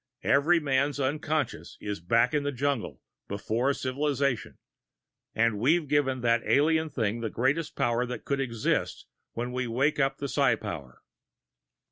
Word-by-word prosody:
Every 160 +5 +4
man's 140 -1 0
unconsciousness 145 0 -2
is 105 -2 -4
back 115 - +2
in 150 - +2
the 145 0 -2
jungle, 140 -2 -2 0.3
before 115 +6 0
civilization 140 -3 -1 0.8
and 110 -2 +2
we've 155 +7 +2
given 135 -3 +1
that 115 -1 +3
alien 160 +2 +2
thing 115 -5 -1
the 115 - -2
greatest 135 +8 0
power 120 +1 +1
that 125 - -6
could 140 -1 -1
exist 115 -5 -1 0.3
when 120 +1 -3
we 125 0 -2
wake 135 +6 +1
up 135 0 +1
the 140 - -3
psi 135 -4 +3
power." 75 - -8
130 Hz, 145 wpm, -28 LUFS, 115-145 Hz, 0.8 s, Every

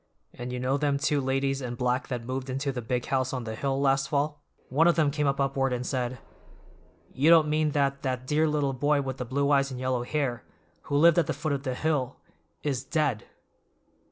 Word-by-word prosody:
And 125 +1 -6
you 125 - -3
know 130 +2 +1
them 145 -1 +1
two 145 0 +1
ladies 135 +1 0
in 120 -2 -4
black 125 +1 0
that 120 -3 -4
moved 130 +1 -4
into 135 +2 -1
the 125 -2 -4
big 125 +1 -2
house 130 -1 0
on 130 -2 -3
the 110 -1 -5
hill 135 +4 -1
last 135 0 +2
fall? 145 +1 -1 0.3
One 155 +6 +4
of 175 - +4
them 155 -3 +2
came 145 0 0
up 140 0 0
afterward 135 -1 +1
and 125 0 -3
said, 125 -1 -2 1.0
"'You 140 +5 +3
don't 165 -2 +7
mean 155 0 +1
that 140 -1 +1
that 130 -2 -2
dear 155 +4 +2
little 145 -3 0
boy 145 +2 +1
with 130 -1 -4
the 125 - -4
blue 140 +4 0
eyes 140 -1 +3
and 130 -2 -6
yellow 130 -1 0
hair, 125 -3 -2 0.4
who 145 - 0
lived 170 +3 +6
at 170 - +1
the - - 0
foot 155 -3 -2
of 140 - -2
the 130 -2 -3
hill, 135 -3 -1 0.5
is 135 -3 -1
dead! 140 -6 -1
135 Hz, 220 wpm, -27 LUFS, 130-145 Hz, 1.0 s, don't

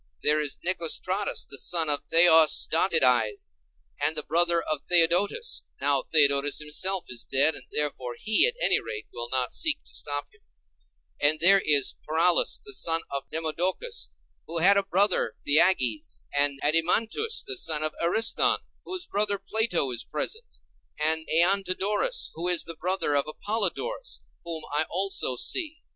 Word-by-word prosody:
There 150 +1 +2
is 145 -2 -5
Nicostratus 185 +3 -1
the 140 - -3
son 165 -2 +1
of 145 -1 +1
Theosdotides, 160 - +3 0.5
and 160 - +2
the 150 - -3
brother 170 +1 +2
of 155 -3 -2
Theodotus 180 - +2 0.2
(now 140 -1 +1
Theodotus 145 -2 +3
himself 170 +5 -1
is 120 -2 -5
dead, 140 +4 +1
and - - -7
therefore 130 -5 -3
he, 220 - +4
at 485 - -2
any - - +2
rate, 440 -2 -7
will 120 0 -7
not 130 -1 -2
seek 310 -2 +1
to - - -17
stop 145 0 -5
him); 415 - -27 0.8
and 150 +2 +2
there 195 +3 +5
is 145 -3 +1
Paralus 165 +3 +2
the 415 - -7
son 165 - +1
of 140 0 -5
Demodocus, 175 - -3 0.4
who 170 - -4
had 190 +5 +5
a 200 - +3
brother 195 +1 0
Theages; 190 - +1
and 140 -1 +1
Adeimantus 220 - 0
the 405 - -4
son 155 - 0
of 155 - -2
Ariston, 220 +7 +2 0.3
whose 370 -1 -4
brother 205 0 0
Plato 210 - 0
is 120 - -3
present; 460 +2 -4 0.4
and 160 +1 +1
Æantodorus, 195 - +1
who 170 +2 -3
is 180 -1 +1
the 165 - -9
brother 180 -3 -2
of 140 - +1
Apollodorus, 230 - -4 0.2
whom 165 -2 -6
I 150 +2 +1
also 190 -7 -2
see. 315 - 0
170 Hz, 150 wpm, -25 LUFS, 150-200 Hz, 0.8 s, there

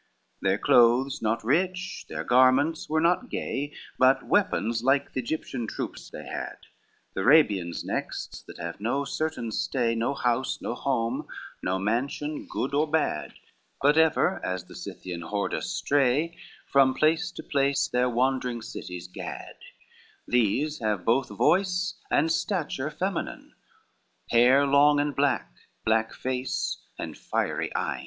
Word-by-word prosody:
XXI - - -43
Their - - +2
clothes 125 +4 +4
not 115 +1 0
rich, 185 +9 -1
their - - -4
garments 130 +6 +3
were 155 +1 +2
not 180 +9 +2
gay, 145 +2 -3 0.3
But 130 +1 +5
weapons 120 - +1
like 135 +2 +2
the - - -1
Egyptian 125 -3 -4
troops - - -6
they - - -9
had, - - -5 0.6
The - - -2
Arabians 100 - +3
next - - -4
that - - -10
have - - -6
no 135 +6 0
certain 155 -7 -3
stay, 120 +1 0
No 115 +4 -1
house, 125 0 0
no - - -3
home, 120 -1 -1 0.3
no 90 +1 0
mansion 130 +9 -2
good 135 - -3
or 150 +2 +2
bad, 150 - -1 0.4
But 145 +2 +4
ever, 160 +3 +3
as 90 -1 -3
the - - -14
Scythian 90 -2 -7
hordes 100 +4 -2
stray, 145 +4 +1 0.3
From 135 -1 +4
place 160 +4 +2
to - - -8
place 140 -1 +1
their 125 0 +1
wandering 125 -1 0
cities 90 -5 -7
gad: 90 - -7 0.7
These 125 +6 +1
have 105 -5 -1
both 120 +2 +2
voice 180 - +2 0.2
and 160 +3 +2
stature 155 -7 -1
feminine, 190 +5 -4 0.8
Hair 125 +4 +6
long 145 +1 +5
and 145 -1 0
black, 130 - +1 0.3
black 110 0 +2
face, 125 - -2 0.2
and - - -5
fiery - - -2
eyne. 70 -4 -1
130 Hz, 140 wpm, -27 LUFS, 115-150 Hz, 0.8 s, Hair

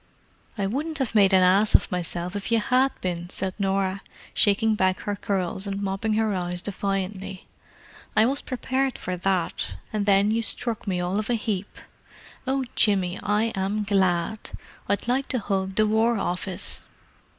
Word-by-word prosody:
"I 200 - 0
wouldn't 290 +10 -2
have 265 -5 -2
made 200 -3 +5
an 190 -1 +6
ass 195 +4 +4
of - - +4
myself 175 +1 -2
if 205 +3 -3
you 230 - +4
had 255 +5 +3
been," 175 -1 -3
said 190 0 -3
Norah, 195 0 0 0.3
shaking 215 +1 +3
back 185 -3 +1
her 205 -1 -2
curls 190 0 -1
and 195 0 -3
mopping 200 +2 -1
her 220 -1 +1
eyes 175 -1 -2
defiantly. 195 -1 -3 0.7
"I 215 - +7
was 275 +4 0
prepared 260 +1 -1
for 185 - -3
that, 180 - -1 0.2
and 210 -1 -1
then 200 +1 +4
you 225 +1 +1
struck 225 -1 -1
me 185 -2 0
all 180 +3 0
of 215 - -4
a 240 - +3
heap! 210 -3 -3 0.7
Oh, 265 0 0
Jimmy, 190 -3 +2
I 210 +3 +1
am 195 +2 -1
glad! 190 0 +1 0.5
I'd 200 +3 0
like 265 +3 +1
to 255 - 0
hug 195 -3 -2
the 215 - +4
War 220 +2 +2
Office!" 180 0 -2
200 Hz, 170 wpm, -25 LUFS, 190-220 Hz, 0.7 s, I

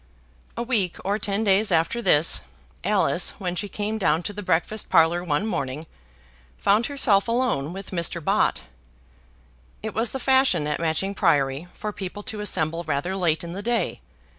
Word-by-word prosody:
A 235 - -1
week 215 -8 0
or 200 +2 0
ten 205 +1 -1
days 200 0 +3
after 165 +8 +1
this, 155 -6 +4 0.4
Alice, - - +1
when 180 -4 -3
she 205 +3 -3
came 215 +2 -3
down 165 -3 +1
to 205 - -4
the 205 - -6
breakfast 195 +4 0
parlour 165 +2 +4
one 165 +3 0
morning, 150 -7 -3 0.7
found 210 +4 +2
herself 235 -9 +3
alone 230 - 0
with 195 +1 -8
Mr. 170 -1 0
Bott. 155 - +1 1.2
It 220 - -4
was 225 0 0
the 265 - -4
fashion 260 - +3
at 150 0 -2
Matching 165 +4 0
Priory 145 -5 +1
for 210 0 -5
people 200 +1 -6
to 215 - -5
assemble 165 -5 -1
rather 155 +5 -2
late 175 -3 0
in 170 0 -6
the 195 - -5
day. 235 +2 -1
190 Hz, 165 wpm, -24 LUFS, 165-215 Hz, 1.2 s, this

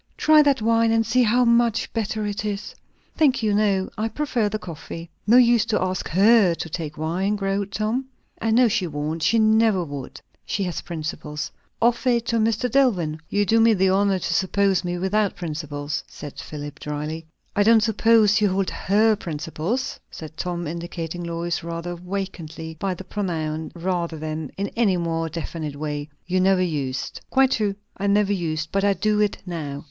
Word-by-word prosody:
"Try 310 0 +6
that 280 -6 +2
wine, 230 0 +3
and 225 0 +2
see 250 +3 +3
how 245 +2 +3
much 235 -1 +2
better 215 -1 -2
it 205 0 -3
is." 205 -1 -4 0.4
"Thank 275 -7 +3
you, 210 -1 +2
no; 200 -2 +2
I 220 - +1
prefer 245 -6 -1
the 215 - -2
coffee." 170 -2 -8 0.2
"No 235 +3 +7
use 240 -3 +5
to 230 -2 0
ask 185 0 -2
her 195 0 +5
to 165 - -5
take 155 -2 -5
wine," 180 +6 0
growled 195 0 -2
Tom. 220 +6 -1 0.4
"I 225 - 0
know 240 +2 +5
she 210 -5 0
won't. 155 +1 -3
She 230 - +3
never 220 -3 +4
would. 140 -4 -7 0.2
She 200 - -2
has 180 -2 -3
principles. 155 -2 -5 0.3
Offer 240 +2 +2
it 235 -1 +2
to 230 - +2
Mr. 225 +2 +1
Dillwyn." 195 - +2
"You 205 0 +1
do 225 +4 +3
me 225 -1 +5
the 190 0 +3
honour 195 0 +3
to 165 - -2
suppose 190 +1 +2
me 175 0 -2
without 200 +3 0
principles," 150 -3 -4
said 145 -2 -9
Philip 145 -1 -7
dryly. 150 +2 -5 0.3
"I 205 - +3
don't 220 +1 +5
suppose 220 -1 +4
you 205 - +4
hold 190 0 0
her 215 +3 +2
principles," 165 - -3
said 155 -1 -9
Tom, 175 +1 -3
indicating 170 +1 -5
Lois 170 0 -3
rather 170 +1 -4
awkwardly 175 -3 -6
by 195 -2 -1
the 190 - -9
pronoun 160 -6 -3
rather 170 -2 -2
than 155 -1 -4
in 200 +1 -2
any 210 -6 +1
more 165 -1 -1
definite 160 -2 -5
way. 150 0 -4 0.2
"You 185 +1 0
never 190 0 +4
used." 140 -6 -3
"Quite 265 0 +4
true; 210 -5 0 0.2
I 200 - -1
never 205 0 +3
used. 160 -4 -2
But 195 0 0
I 200 0 +4
do 210 +3 +1
it 210 -1 +1
now." 155 -6 -5
190 Hz, 185 wpm, -23 LUFS, 165-220 Hz, 0.4 s, No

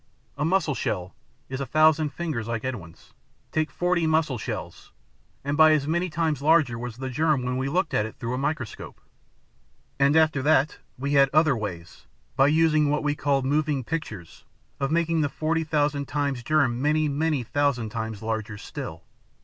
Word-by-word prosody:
A 150 - -2
mussel 165 -2 +1
shell 90 -7 -3 0.3
is 130 +1 -5
a 135 - -3
thousand 155 +1 +3
fingers 150 -11 -4
like 115 0 -3
Edwin's. 90 -11 -7 0.4
Take 155 0 0
forty 175 -2 0
mussel 155 -6 +1
shells, - - -6 0.5
and 140 +1 -1
by 155 0 +7
as 145 -2 +1
many 170 +3 0
times 155 -3 -1
larger 145 -6 +3
was 120 -1 -6
the 130 0 -5
germ 150 0 +1
when 125 0 -2
we 130 +1 -1
looked 175 +3 0
at 105 - +1
it 110 - -12
through 120 +1 -4
a - - -2
microscope. 140 -5 -4 1.0
And 140 +2 +4
after 155 -3 +3
that, 145 0 +2 0.2
we 140 +3 -2
had 140 -1 +5
other 155 -2 +4
ways, 90 -7 -7 0.3
by 135 +1 +5
using 155 -1 +3
what 150 +1 0
we 145 0 +1
called 140 -2 0
moving 145 -1 0
pictures, 115 - -6 0.4
of 135 - 0
making 165 0 +1
the 145 - +1
forty 160 +2 -1
thousand 150 -2 0
times 140 -3 -1
germ 125 -3 +1
many, 155 +2 +2
many 150 -1 0
thousand 125 -2 0
times 110 -2 -5
larger 110 -1 -3
still. - - -7
145 Hz, 175 wpm, -25 LUFS, 125-155 Hz, 1.0 s, by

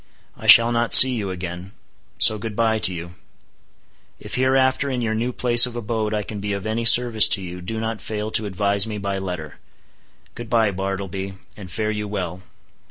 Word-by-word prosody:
I - - -10
shall 115 +1 +8
not 120 0 +5
see 130 - +8
you 105 -6 -4
again; 90 +1 -8 0.4
so 110 - +5
good 105 0 -7
bye 110 -1 0
to 105 -3 +2
you. 85 0 -9 1.1
If - - -11
hereafter 130 +1 0
in 130 -2 -4
your 115 -2 -3
new 115 +3 -3
place 120 0 +4
of 120 - -11
abode 110 -2 -4
I 105 -1 -3
can 105 0 -8
be 100 0 -5
of 100 0 -6
any 110 +2 -3
service 115 -2 +5
to 95 - +1
you, 90 0 -9
do 110 +5 -6
not 110 -1 -5
fail 110 0 -6
to 110 -1 0
advise 100 +1 +1
me 105 -1 -6
by 100 -1 -5
letter. 90 -6 -8 0.7
Good 120 -2 -10
bye, 110 -3 +1
Bartleby, 95 0 -6 0.2
and 95 -3 -12
fare 110 +4 -4
you 105 -1 -5
well." 95 -3 -6
105 Hz, 195 wpm, -20 LUFS, 95-115 Hz, 1.1 s, shall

